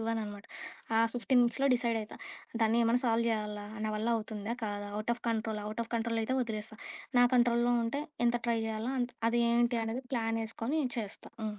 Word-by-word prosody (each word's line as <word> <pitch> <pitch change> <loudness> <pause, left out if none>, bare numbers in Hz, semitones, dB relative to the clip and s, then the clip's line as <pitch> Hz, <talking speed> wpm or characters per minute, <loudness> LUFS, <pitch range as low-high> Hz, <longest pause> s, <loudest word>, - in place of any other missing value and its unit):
ఇవ్వననమాట. 220 -3 -3 0.5
ఆ - - +5 0.2
15 245 +1 +3
మినిట్స్‌లో 255 +4 +2
డిసైడయితా. 230 -3 -1 0.4
దాన్ని 225 +1 +3
ఏమన్నా 235 +2 +3
సాల్వ్ 230 0 +2
జెయ్యాలా, 210 -2 -2 0.2
నా 215 - 0
వల్లవుతుందా, 220 0 -1
కాదా? 205 -1 -3
Out 215 +3 0
of 240 - -16
control, 220 -1 -1
out 215 +2 -4
of - - -19
కంట్రోలయితే 230 +2 0
ఒదిలేస్తా. 220 -1 -5 0.4
నా 245 - +8
కంట్రోల్‌లో 240 0 +4
ఉంటే, 280 +6 -1 0.2
ఎంత 240 0 +3
ట్రై 230 -1 +2
జెయ్యాల్నో 220 +4 -2
అంత్ 245 0 -2
అది 240 +1 +2
ఏంటి 240 0 +3
అనేది 240 +4 -3
ప్లానేసుకొని 225 +4 -1 0.2
చేస్తా. 210 -2 -6
హ్మ్. 210 -1 -3
230 Hz, 165 wpm, -32 LUFS, 215-240 Hz, 0.5 s, నా